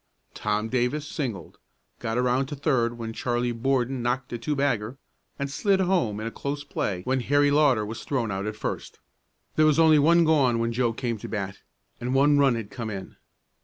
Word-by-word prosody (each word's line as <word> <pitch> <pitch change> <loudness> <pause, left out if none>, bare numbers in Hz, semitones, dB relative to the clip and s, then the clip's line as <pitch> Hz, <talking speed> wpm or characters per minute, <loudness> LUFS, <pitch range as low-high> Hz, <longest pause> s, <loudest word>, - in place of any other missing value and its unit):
Tom 105 +1 -1
Davis 130 +5 -1
singled, 115 - -5 0.4
got 115 0 -2
around 125 +2 +1
to 145 - -5
third 125 -5 0
when 115 -1 -5
Charlie 120 +1 -1
Borden 130 +1 0
knocked 125 +1 -2
a 120 - -3
two 150 +6 -2
bagger, 130 -4 -1 0.4
and 140 - -2
slid 195 +7 +1
home 175 - +1
in 110 - -4
a 115 - -3
close 140 +3 -4
play 95 -9 -3
when 130 +4 0
Harry 145 +3 +3
Lauter 140 -7 +3
was 110 +2 -6
thrown 120 -6 -1
out 95 +1 -3
at 105 - -4
first. - - -5 0.6
There 155 0 +5
was 155 -1 +3
only 160 -2 +6
one 170 +4 +5
gone 140 -7 +3
when 115 0 -1
Joe 120 -1 +1
came 115 -1 -3
to - - -7
bat, 100 -2 -4 0.4
and 125 +2 -2
one 145 +1 +5
run 135 -3 +4
had 110 -3 -6
come 115 -3 -5
in. 95 -2 -7
125 Hz, 200 wpm, -26 LUFS, 115-145 Hz, 0.6 s, only